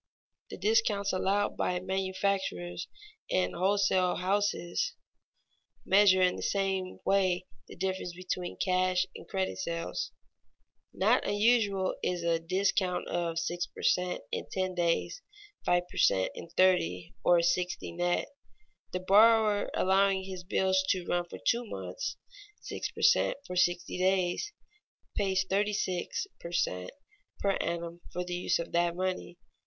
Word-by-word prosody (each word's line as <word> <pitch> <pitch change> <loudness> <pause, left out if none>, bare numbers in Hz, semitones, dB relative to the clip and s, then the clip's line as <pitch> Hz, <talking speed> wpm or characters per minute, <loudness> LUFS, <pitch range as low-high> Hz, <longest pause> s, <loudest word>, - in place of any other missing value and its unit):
The - - -7
discounts 205 -1 +2
allowed 200 +2 +1
by 180 0 0
manufacturers 190 - -2 0.4
and 185 - +1
wholesale 190 0 +2
houses 200 - 0 0.9
measure 190 -1 +5
in 180 - +2
the - - -6
same 190 -2 -1
way 185 -2 +2 0.2
the - - -11
difference 190 -1 -3
between 180 0 -4
cash 185 0 +2
and - - -10
credit 190 -1 -2
sales. 170 -2 -3 0.8
Not - - +2
unusual 205 -3 +2
is 175 -1 -1
a 170 -1 +2
discount 185 +1 0
of 170 -1 -1
"six 175 +1 -2
per - - -11
cent, 180 0 +1
in - - -3
ten 185 -1 -1
days, 175 - 0 0.4
five 175 0 +3
per - - -12
cent, 95 -1 +3
in 170 - -9
thirty, 130 - +2
or 175 -1 +5
sixty 180 +1 0
net." 175 +1 0 0.7
The 180 - -2
buyer 210 +2 +5
allowing 195 0 +3
his 185 -1 -7
bills 190 0 +2
to 185 -2 +1
run 175 0 0
for - - -7
two 235 +1 +1
months 485 - -5 0.5
(six - - -4
per - - -8
cent, 470 - +4
for 180 - -6
sixty 175 0 +1
days) 185 - +1 0.6
pays 190 -2 +1
thirty 205 +2 +1
six 185 - -2
per 170 - -8
cent, 90 - -1 0.5
per 200 - +2
annum 170 0 -4
for 180 - -3
the 180 0 -5
use 175 - +1
of 170 - -5
that 170 0 +1
money. 185 -1 -3
185 Hz, 140 wpm, -30 LUFS, 175-195 Hz, 0.9 s, measure